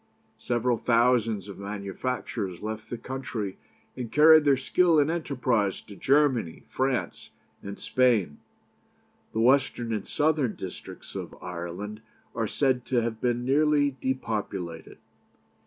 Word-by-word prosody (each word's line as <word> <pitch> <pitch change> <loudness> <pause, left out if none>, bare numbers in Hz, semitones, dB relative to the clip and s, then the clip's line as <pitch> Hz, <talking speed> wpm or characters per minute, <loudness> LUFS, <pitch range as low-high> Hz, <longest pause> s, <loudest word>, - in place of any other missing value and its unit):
Several 120 0 0
thousands 115 -4 +2
of 100 - -9
manufacturers 100 -1 -4
left 110 0 -5
the 120 - -4
country, 115 -6 -5 0.4
and 120 -3 -5
carried 155 0 +7
their 140 -2 +5
skill 165 +4 +3
and 145 +2 +3
enterprise 125 - 0
to 100 - -13
Germany, 130 - +2
France, 130 -1 -2 0.3
and 100 0 -7
Spain. 115 - +1 0.9
The 110 - -1
western 120 -2 +2
and 105 - -3
southern 150 -6 +1
districts 95 -2 -9
of - - -6
Ireland 90 +5 -6 0.3
are 115 -1 -1
said 130 +1 +1
to 120 -3 +1
have 115 -1 -3
been 120 0 0
nearly 145 0 +3
depopulated. 100 -10 -3
120 Hz, 125 wpm, -27 LUFS, 105-135 Hz, 0.9 s, carried